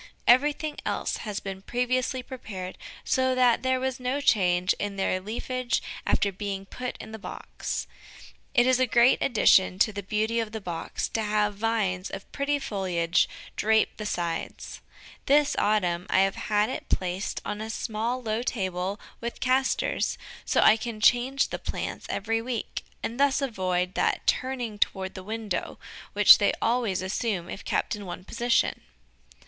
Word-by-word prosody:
Everything 295 Hz, +5 st, +3 dB
else -, -, -1 dB
had 210 Hz, -2 st, -5 dB
been 195 Hz, -1 st, -5 dB
previously 255 Hz, +3 st, -1 dB
prepared 195 Hz, -8 st, -7 dB, 0.3 s
so 260 Hz, 0 st, +2 dB
that 250 Hz, -2 st, +4 dB
there 260 Hz, 0 st, +1 dB
was 260 Hz, 0 st, -2 dB
no 255 Hz, +3 st, -1 dB
change 185 Hz, -8 st, +3 dB
in 205 Hz, -1 st, -3 dB
their 190 Hz, -1 st, 0 dB
leafage 240 Hz, +4 st, -2 dB, 0.3 s
after 200 Hz, -, +2 dB
being 195 Hz, 0 st, -4 dB
put 250 Hz, +5 st, -6 dB
in 220 Hz, -, -9 dB
the 220 Hz, -, -7 dB
box. -, -, -5 dB, 0.7 s
It 240 Hz, -2 st, +6 dB
is 255 Hz, 0 st, +4 dB
a 255 Hz, -, +3 dB
great 240 Hz, +2 st, +4 dB
addition 190 Hz, -6 st, +4 dB
to 215 Hz, +2 st, +3 dB
the 200 Hz, -, -4 dB
beauty 215 Hz, +3 st, 0 dB
of 225 Hz, -1 st, -3 dB
the 220 Hz, -, -3 dB
box 170 Hz, -4 st, -4 dB
to 225 Hz, -, -1 dB
have 210 Hz, 0 st, +1 dB
vines 205 Hz, -4 st, -1 dB
of 195 Hz, -, -8 dB
pretty 285 Hz, +1 st, 0 dB
foliage 185 Hz, -9 st, 0 dB, 0.3 s
drape 220 Hz, +1 st, +2 dB
the 215 Hz, -, -4 dB
sides. 170 Hz, -4 st, -4 dB, 0.5 s
This 290 Hz, +1 st, +4 dB
autumn 180 Hz, -4 st, +1 dB
I 190 Hz, -, +4 dB
have 195 Hz, 0 st, +2 dB
had 210 Hz, 0 st, +3 dB
it -, -, -6 dB
placed 185 Hz, +2 st, -1 dB
on 210 Hz, -, -3 dB
a 220 Hz, -, -5 dB
small, 225 Hz, +3 st, -2 dB
low 220 Hz, 0 st, -1 dB
table 190 Hz, -4 st, -2 dB, 0.2 s
with 235 Hz, 0 st, -5 dB
castors, 260 Hz, +1 st, +1 dB, 0.3 s
so -, -, +2 dB
I 220 Hz, -, +7 dB
can 230 Hz, -1 st, -5 dB
change 245 Hz, +5 st, +3 dB
the -, -, -4 dB
plants -, -, -5 dB
every 225 Hz, +2 st, -1 dB
week, 235 Hz, -1 st, -4 dB, 0.2 s
and 235 Hz, +3 st, -4 dB
thus 280 Hz, -1 st, +4 dB
avoid 185 Hz, -8 st, -1 dB
that -, -, 0 dB
turning 245 Hz, -5 st, -1 dB
toward 190 Hz, -2 st, 0 dB
the 190 Hz, -, -7 dB
window 215 Hz, -2 st, -4 dB, 0.4 s
which -, -, +9 dB
they -, -, +3 dB
always 230 Hz, -6 st, +1 dB
assume 190 Hz, -2 st, -2 dB
if -, -, -7 dB
kept -, -, 0 dB
in 205 Hz, -2 st, -8 dB
one 180 Hz, +1 st, -6 dB
position. 235 Hz, +3 st, +1 dB
220 Hz, 165 wpm, -27 LUFS, 195-250 Hz, 0.7 s, which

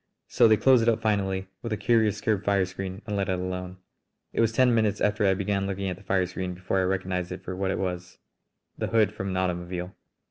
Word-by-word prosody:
So -, -, +5 dB
they 110 Hz, -1 st, +5 dB
closed 130 Hz, 0 st, +5 dB
it 115 Hz, -, +3 dB
up 115 Hz, -, +2 dB
finally 100 Hz, -3 st, 0 dB, 0.2 s
with 115 Hz, -, -5 dB
a 110 Hz, -, 0 dB
curious 110 Hz, -3 st, +2 dB
curved 105 Hz, -2 st, 0 dB
fire 100 Hz, -2 st, +2 dB
screen 95 Hz, +2 st, -6 dB
and 105 Hz, -, -3 dB
let 100 Hz, -1 st, -1 dB
it 95 Hz, -, +1 dB
alone. 90 Hz, 0 st, -4 dB, 0.6 s
It -, -, +1 dB
was 115 Hz, -1 st, +3 dB
ten 125 Hz, +1 st, +4 dB
minutes 110 Hz, -3 st, +2 dB
after 105 Hz, 0 st, +2 dB
I 95 Hz, -, +3 dB
began 100 Hz, 0 st, -1 dB
looking 100 Hz, 0 st, -3 dB
at -, -, -4 dB
the -, -, -15 dB
fire 95 Hz, -2 st, +1 dB
screen 90 Hz, 0 st, -5 dB
before 95 Hz, +1 st, -1 dB
I -, -, +2 dB
recognised 90 Hz, -1 st, -2 dB
it 90 Hz, -, -7 dB
for 90 Hz, -, -5 dB
what 95 Hz, 0 st, -1 dB
it -, -, -1 dB
was 90 Hz, -1 st, -4 dB, 0.6 s
the -, -, -3 dB
hood 110 Hz, -3 st, +2 dB
from 100 Hz, -2 st, -4 dB
an 95 Hz, -, -2 dB
automobile! 90 Hz, 0 st, -2 dB
95 Hz, 240 wpm, -26 LUFS, 90-105 Hz, 0.6 s, So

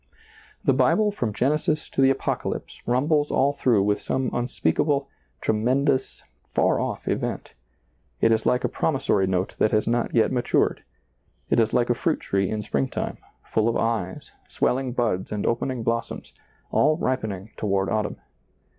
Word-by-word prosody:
The -, -, +4 dB
Bible 215 Hz, -1 st, +3 dB
from 120 Hz, -, -2 dB
Genesis 150 Hz, +6 st, 0 dB
to -, -, -1 dB
the 135 Hz, -, +6 dB
Apocalypse 135 Hz, -, -2 dB
rum 125 Hz, +3 st, +2 dB
bles 150 Hz, -2 st, +2 dB
all 140 Hz, +2 st, +2 dB
through 120 Hz, -8 st, +2 dB
with 105 Hz, 0 st, +1 dB
some 130 Hz, -1 st, -1 dB
unspeakable, 135 Hz, -, 0 dB, 0.3 s
tremen 125 Hz, +6 st, +1 dB
dous, 135 Hz, -3 st, 0 dB, 0.2 s
far -, -, +2 dB
off -, -, -3 dB
event; -, -, -2 dB, 0.7 s
it 115 Hz, -, +4 dB
is 110 Hz, -1 st, +2 dB
like 125 Hz, 0 st, +2 dB
a -, -, +2 dB
promissory 135 Hz, -10 st, +1 dB
note 95 Hz, 0 st, -1 dB
that 110 Hz, -, +4 dB
has 105 Hz, 0 st, +1 dB
not 120 Hz, +1 st, 0 dB
yet 115 Hz, -, +4 dB
matured; 125 Hz, -2 st, +1 dB, 0.7 s
it -, -, +4 dB
is 115 Hz, -1 st, +3 dB
like 120 Hz, 0 st, +2 dB
a -, -, +5 dB
fruit 160 Hz, +6 st, 0 dB
tree 95 Hz, -1 st, 0 dB
in 105 Hz, -1 st, -2 dB
springtime, 70 Hz, -7 st, -2 dB, 0.2 s
full 110 Hz, +1 st, +1 dB
of 115 Hz, -, 0 dB
eyes, 110 Hz, -5 st, -2 dB, 0.2 s
swelling 130 Hz, 0 st, 0 dB
buds 115 Hz, -7 st, -1 dB
and 105 Hz, -1 st, -2 dB
opening 120 Hz, +1 st, -1 dB
blossoms, 115 Hz, +1 st, -3 dB, 0.4 s
all 155 Hz, +2 st, +3 dB
ripening 110 Hz, -, -2 dB
toward 100 Hz, -2 st, 0 dB
autumn. 110 Hz, -2 st, -1 dB
120 Hz, 160 wpm, -24 LUFS, 105-135 Hz, 0.7 s, the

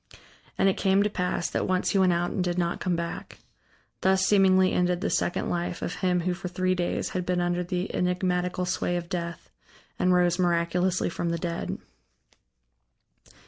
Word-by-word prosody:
And -, -, +3 dB
it 195 Hz, -, +2 dB
came 195 Hz, 0 st, +3 dB
to 210 Hz, -, 0 dB
pass 180 Hz, -3 st, -1 dB
that -, -, -1 dB
once 185 Hz, -1 st, +1 dB
he 195 Hz, -, +2 dB
went 185 Hz, -1 st, +4 dB
out 175 Hz, 0 st, 0 dB
and 185 Hz, -, -1 dB
did 175 Hz, 0 st, -1 dB
not 170 Hz, -1 st, 0 dB
come 180 Hz, -2 st, 0 dB
back. 170 Hz, 0 st, -5 dB, 0.6 s
Thus 190 Hz, 0 st, +3 dB
seemingly 190 Hz, -2 st, +4 dB
ended 180 Hz, 0 st, +1 dB
the 205 Hz, -, -2 dB
second 175 Hz, -, 0 dB
life 175 Hz, 0 st, -2 dB
of -, -, -2 dB
him 180 Hz, -2 st, +1 dB
who 180 Hz, +1 st, 0 dB
for 180 Hz, +1 st, -6 dB
three 185 Hz, +1 st, 0 dB
days 175 Hz, -1 st, -1 dB
had 185 Hz, -, -2 dB
been 180 Hz, 0 st, 0 dB
under 175 Hz, 0 st, 0 dB
the 180 Hz, +2 st, -3 dB
enigmatical 180 Hz, 0 st, 0 dB
sway 175 Hz, -1 st, -1 dB
of 170 Hz, -1 st, -6 dB
death, 170 Hz, -2 st, -5 dB, 0.5 s
and 180 Hz, 0 st, +3 dB
rose 175 Hz, 0 st, +3 dB
miraculously 175 Hz, +1 st, +1 dB
from 170 Hz, -, -2 dB
the 170 Hz, -, -1 dB
dead. 170 Hz, 0 st, -3 dB
180 Hz, 185 wpm, -27 LUFS, 175-185 Hz, 0.6 s, went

